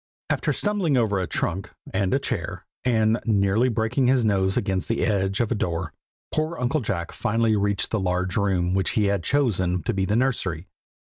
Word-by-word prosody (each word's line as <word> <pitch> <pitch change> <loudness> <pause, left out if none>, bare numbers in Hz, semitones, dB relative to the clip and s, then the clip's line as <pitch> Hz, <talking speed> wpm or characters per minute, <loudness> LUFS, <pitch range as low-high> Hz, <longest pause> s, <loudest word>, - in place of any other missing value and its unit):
After - - 0
stumbling 195 -9 0
over 105 -5 +2
a 90 - -2
trunk, 95 +4 -2 0.2
and 95 -1 +1
a - - +3
chair, - - -4 0.2
and 115 -2 +2
nearly 105 +2 +2
breaking 120 +3 +1
his 130 -2 +3
nose 95 -2 +2
against 95 -2 -1
the 115 - +1
edge 95 -1 0
of 120 -1 0
a - - +4
door, 85 -6 -2 0.4
poor 155 +2 -1
Uncle 125 +5 0
Jack 85 -6 -3
finally 115 0 +1
reached 100 -1 +1
the 110 - +1
large 90 0 -1
room 95 -3 +1
which 95 -1 +1
he 105 - +4
had 100 -3 0
chosen 95 - +1
to - - -1
be 95 -1 0
the 105 - 0
nursery. 105 -10 0
100 Hz, 190 wpm, -24 LUFS, 95-120 Hz, 0.4 s, a